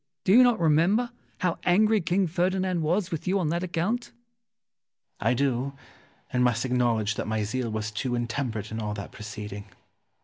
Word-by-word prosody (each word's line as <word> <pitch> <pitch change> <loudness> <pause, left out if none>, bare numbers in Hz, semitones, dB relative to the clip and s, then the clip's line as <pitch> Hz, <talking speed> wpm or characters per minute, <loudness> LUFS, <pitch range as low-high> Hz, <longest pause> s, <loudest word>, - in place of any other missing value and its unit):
Do - - +2
you 245 - +9
not 245 -3 +4
remember 175 +10 +3 0.3
how 180 -3 0
angry 215 +4 +4
King 180 +4 +1
Ferdinand 185 +1 0
was 175 +5 0
with 165 0 -4
you 190 +2 +2
on 175 -6 0
that 170 +2 0
account? 185 +7 -1
Ximenes. - - -19 1.2
I - - +3
do, 135 0 0 0.6
and 125 0 +3
must 120 0 +2
acknowledge 120 -4 +1
that - - -4
my 110 -1 0
zeal 115 +3 -2
was 110 -1 -3
too 120 +3 -2
intemperate 115 -3 -3
in 110 - -3
all 105 -1 -3
that 100 - -7
proceeding. 105 -1 -7
140 Hz, 175 wpm, -27 LUFS, 110-185 Hz, 1.2 s, you